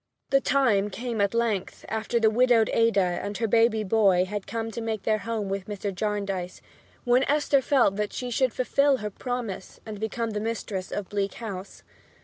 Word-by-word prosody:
The 275 0 +4
time 235 -8 +2
came 230 +1 -3
at 200 +2 +1
length, 225 -5 -1
after 220 +2 -1
the 220 -1 +4
widowed 240 -1 +4
Ada 200 -6 +2
and 205 0 -4
her 230 - 0
baby 225 0 +3
boy 195 -3 +3
had 205 +1 -5
come 225 0 -3
to 230 - -5
make 220 -3 -3
their 215 -1 +1
home 225 -2 -3
with 195 0 -3
Mr. 205 -1 -4
Jarndyce, 195 -2 -3 0.4
when 250 +1 +3
Esther 290 -1 +2
felt 255 -7 +3
that 210 -1 -1
she 250 -1 -5
should 255 +1 +2
fulfil 280 +3 +2
her 210 -3 -5
promise 235 -4 -5
and 215 -2 -7
become 220 +1 -2
the 210 - -2
mistress 210 -4 -4
of 205 -3 -4
Bleak 200 -1 -2
House. 200 -4 -7
220 Hz, 185 wpm, -26 LUFS, 200-235 Hz, 0.4 s, The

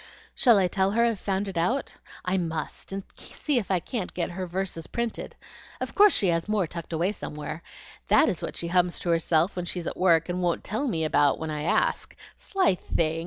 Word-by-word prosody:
"Shall 235 -5 +5
I 190 - +4
tell 190 +2 +1
her 235 +1 +4
I've 230 -4 0
found 195 +1 -1
it 185 -4 -2
out? 245 +12 0 0.3
I 180 +1 +1
must! 165 -2 -3
and 195 0 -4
see 290 -5 -1
if 205 - -6
I 190 -2 +2
can't 205 +2 -5
get 175 -1 -1
her 185 +1 -4
verses 180 -2 -3
printed. 235 -1 -4 0.4
Of - - -4
course 415 0 +7
she 195 - +2
has 165 +3 0
more 210 -4 +2
tucked 170 0 -8
away 170 +4 +1
somewhere. 150 -4 -6 0.5
That 315 - +5
is 185 - -1
what - - -5
she 170 - -3
hums 180 0 +2
to 175 - -3
herself 165 +2 +2
when 180 -1 -3
she's 175 -1 -3
at - - -3
work, 165 -3 +4
and 180 0 -2
won't 175 -1 0
tell 225 +7 -2
me 165 -9 -1
about 145 -2 +3
when 160 -1 -4
I 150 -1 -3
ask. 155 - 0 0.2
Sly 385 - +1
thing! 165 -2 -1
180 Hz, 215 wpm, -26 LUFS, 165-200 Hz, 0.5 s, course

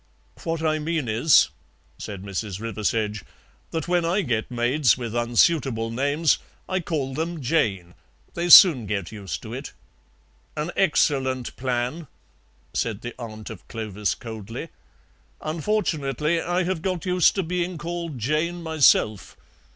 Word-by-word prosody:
"What 165 -2 -2
I 155 -1 +1
mean 155 -3 -2
is," 115 +7 +4 0.5
said 100 -2 -7
Mrs. 100 0 -4
Riversedge, 110 -2 -2 0.5
"that 160 -1 -3
when 175 -1 +2
I 175 +5 +1
get 115 -5 -1
maids 125 +2 +2
with 120 -2 -5
unsuitable 120 -1 +2
names 145 +6 +1 0.3
I 185 - 0
call 150 -6 -3
them 165 +3 -3
Jane; 105 - 0 0.4
they 175 +1 -2
soon 160 - +9
get 100 -4 -3
used 95 -10 -6
to - - -7
it." - - -7 0.8
"An 150 +3 -2
excellent 130 -8 +1
plan," 125 +5 -2 0.7
said 110 -2 -2
the 120 - -6
aunt 110 -2 -7
of 105 - -11
Clovis 105 -2 -3
coldly; 115 +6 -7 0.7
"unfortunately 155 - -1
I 175 +2 0
have 180 -2 -2
got 185 -1 -2
used 180 -1 +3
to 195 - 0
being 175 +1 -2
called 170 -3 -5
Jane 155 +8 -1
myself. 140 - +2
135 Hz, 135 wpm, -24 LUFS, 115-165 Hz, 0.8 s, soon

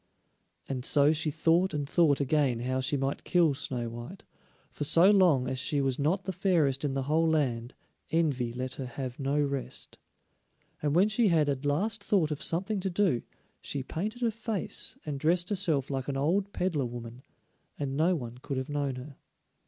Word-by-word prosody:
And 130 -2 -4
so 145 +2 +4
she 155 0 0
thought 170 +4 +2
and 145 -1 -2
thought 150 -2 +3
again 140 -4 +1
how 130 +1 -1
she 130 +2 0
might 135 +1 -2
kill 170 -5 +3
Snow 125 -3 -3
white, 120 +11 -8 0.5
for - - -4
so 170 +6 +6
long 175 -11 +4
as 130 - -2
she 145 +2 0
was 135 -1 0
not 170 +7 +1
the 190 - -2
fairest 165 -8 +1
in 140 -2 -1
the 135 - -1
whole 160 +4 +2
land, 125 -6 -1 0.3
envy 140 -8 0
let 125 +2 -4
her 135 -2 -5
have 125 +1 -6
no 140 +2 0
rest. 140 -3 -4 0.8
And 150 0 0
when 190 +4 +5
she 215 +1 +2
had 160 -5 +3
at 140 +1 -2
last 200 +9 +1
thought 180 -7 +2
of 150 - -4
something 195 +5 0
to 190 +1 -2
do, 180 -9 +1 0.4
she 140 - -3
painted 215 - -4
her 230 - +2
face 220 -3 -3
and 145 -3 -4
dressed 170 +4 +2
herself 165 -10 +1
like 135 -2 -3
an 140 -1 -2
old 190 +8 +1
peddler 170 -8 -1
woman, 120 +1 -8 0.6
and 135 -2 -3
no 165 +5 +3
one 120 -5 -6
could 135 +1 -4
have 130 +2 -3
known 145 -2 -1
her. 130 +2 -9
145 Hz, 190 wpm, -29 LUFS, 130-175 Hz, 0.8 s, so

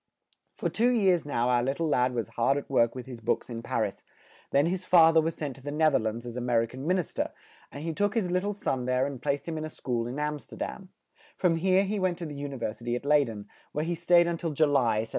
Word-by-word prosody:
For - - -1
two 235 +3 +2
years 190 -10 +2
now 120 -4 0
our 120 -1 +3
lit 135 +3 -1
tle 165 - 0
lad 125 -3 +2
was 115 -1 -2
hard 120 +4 +1
at 145 - -5
work 120 -3 +3
with 125 - -6
his 125 -3 -9
books 115 - -1
in 115 -1 -5
Par - - 0
is; - - -7 0.5
then 140 +2 +3
his 180 +2 -1
fa 165 -3 +6
ther 160 - +6
was 165 +1 -2
sent 140 -4 -5
to - - -14
the 145 - -6
Neth 155 0 +3
er - - +4
lands 110 +1 -3
as 120 -1 -7
A 125 - -3
mer 120 -2 +2
i - - -1
can 130 +5 -8
Min 185 +2 +3
is 180 - -3
ter, - - -2 0.4
and 145 - -7
he 165 0 -2
took 205 +6 0
his 195 -6 0
lit 180 0 +2
tle 205 +1 -2
son 130 -10 -2
there 125 +1 +1
and 135 -3 -5
placed 140 +1 -1
him 160 -1 -3
in - - -4
a - - -5
school 120 -6 -3
in 125 +3 -5
Am 150 0 -2
ster - - -12
dam; 190 -2 -6 0.5
from 170 -3 +2
here 185 +3 +3
he 200 +1 -2
went 185 -2 0
to 175 - -5
the 150 - -6
U 145 0 -5
ni 135 - -6
ver 115 -3 -2
si 115 - -16
ty 120 - -2
at 125 - -5
Ley 145 0 +4
den, 105 -3 -8 0.3
where 150 +1 -1
he 175 - -1
stayed 170 +1 +4
un 170 -1 -1
til 165 - -2
Ju 155 +2 +4
ly, 130 -7 +2
1781. 110 - -5
145 Hz, 305 wpm, -28 LUFS, 125-170 Hz, 0.5 s, fa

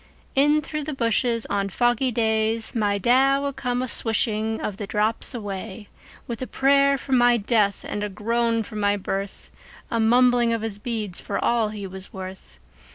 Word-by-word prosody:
In 295 +2 +3
through 300 +1 -4
the 305 -2 -4
bushes, 230 -1 0
on 200 -1 -1
foggy 240 +5 +1
days, 220 -1 0
My 205 -3 +1
Da 260 +6 +3
would 280 -1 -3
come 245 -1 -2
a - - -3
swishing 220 -1 +1
of 200 - -4
the 205 -2 -5
drops 215 +4 +1
away, 205 -1 -6 0.4
With 235 0 -6
a 255 - -3
prayer 275 +1 +3
for 270 - -10
my 245 -1 +5
death 210 -2 +1
and 205 - -3
a 210 - -2
groan 230 +3 0
for 215 0 -9
my 205 0 +1
birth, 195 0 -5 0.4
A 230 - 0
mumbling 240 +1 +4
of 225 -1 -2
his 210 -2 -4
beads 215 -5 -4
for 200 - -4
all 230 -3 +1
he 210 -2 -6
was 190 0 -10
worth. 190 0 -9
225 Hz, 180 wpm, -24 LUFS, 205-245 Hz, 0.4 s, my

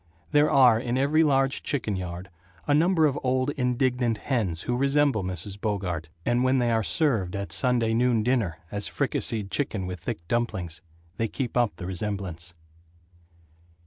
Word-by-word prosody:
There 150 0 +4
are 125 -5 +6
in 120 +1 -2
every 145 +4 +3
large 135 -3 +2
chicken 115 -8 -2
yard 90 0 -6 0.3
a 145 - +2
number 165 +2 +4
of 145 -1 +1
old 130 +2 +1
and 125 -3 -1
indignant 125 -3 +1
hens 105 - -1
who 120 - -1
resemble 140 -4 +2
Mrs. 95 +2 -4
Bogart, 90 -7 -2 0.2
and 120 +1 +2
when 130 +1 +3
they 120 -2 +2
are 115 -1 +2
served 110 - 0
at 100 0 -4
Sunday 120 -3 +2
noon 120 -1 +2
dinner, 110 -9 0
as 100 0 -2
fricasseed 105 -3 -1
chicken 110 -9 -1
with 90 -1 -5
thick 85 -2 -6
dumplings, 95 -8 -2 0.4
they 115 - 0
keep 125 +2 -4
up 120 -3 +2
the 90 - -7
resemblance. 90 -3 -4
115 Hz, 165 wpm, -26 LUFS, 95-130 Hz, 0.4 s, are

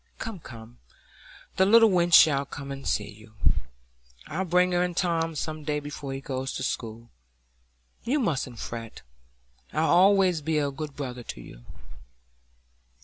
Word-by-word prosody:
"Come, 225 -5 -6
come!—the 115 - -7
little 225 +2 +6
wench 175 -1 +2
shall 140 -3 +6
come 140 0 -8
and 135 0 -6
see 105 - 0
you. 110 +1 -15 0.9
I'll 185 +5 -3
bring 180 +1 +3
her 175 0 +2
and 180 -1 -2
Tom 165 -3 0
some 155 +1 -4
day 150 0 -1
before 145 -1 -7
he 135 - -4
goes 135 -1 -4
to - - -4
school. 115 -2 -4 0.9
You 265 +6 +1
mustn't 135 - -1
fret. 115 -1 -7 0.7
I'll 170 +5 +5
allays 190 -5 +3
be 160 +1 0
a 145 -2 0
good 150 +1 -7
brother 125 -3 -5
to 115 - -8
you." - - -13
150 Hz, 145 wpm, -26 LUFS, 130-175 Hz, 0.9 s, little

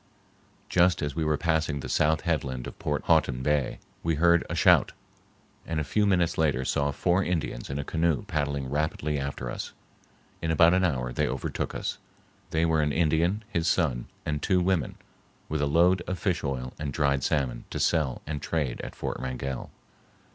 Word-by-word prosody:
Just 90 -1 +3
as 75 -1 -3
we 80 - 0
were 75 -1 +1
passing 80 -1 0
the - - -6
south 80 +1 +2
headland 70 -7 -2
of - - -9
Port 75 -1 -2
Houghton 65 -1 +2
Bay, 75 -2 +1 0.2
we 80 -1 0
heard 85 +2 +4
a - - -2
shout, - - +5 0.7
and 80 -1 -1
a - - 0
few 105 +7 +1
minutes 90 -5 +2
later 70 -5 +2
saw 70 +2 +1
four 90 +6 +1
Indians 80 -9 -2
in 70 - -3
a 70 - -2
canoe 80 -2 0
paddling 70 -2 -2
rapidly 75 +1 -1
after 70 -3 -4
us. - - -6 0.7
In 80 - -2
about 85 +1 +5
an 95 0 +3
hour 60 -8 0
they - - +1
overtook - - -3
us. - - -3 0.5
They 80 +1 +1
were 80 -1 +2
an 75 -1 +1
Indian, 85 +6 +2
his 85 0 -1
son, 65 -9 +1 0.2
and 75 -1 -2
two 95 +2 +2
women 90 -3 0 0.5
with 75 -1 -2
a 75 - +2
load 85 +5 +4
of 90 - -2
fish 90 0 -1
oil 65 -3 -3
and 75 -2 -3
dried 70 -1 +1
salmon 65 -4 -1
to - - -4
sell 75 -7 +1
and 75 -1 -4
trade 75 -5 -2
at - - -8
Fort - - -4
Wrangell. 65 0 -4
75 Hz, 185 wpm, -27 LUFS, 70-85 Hz, 0.7 s, shout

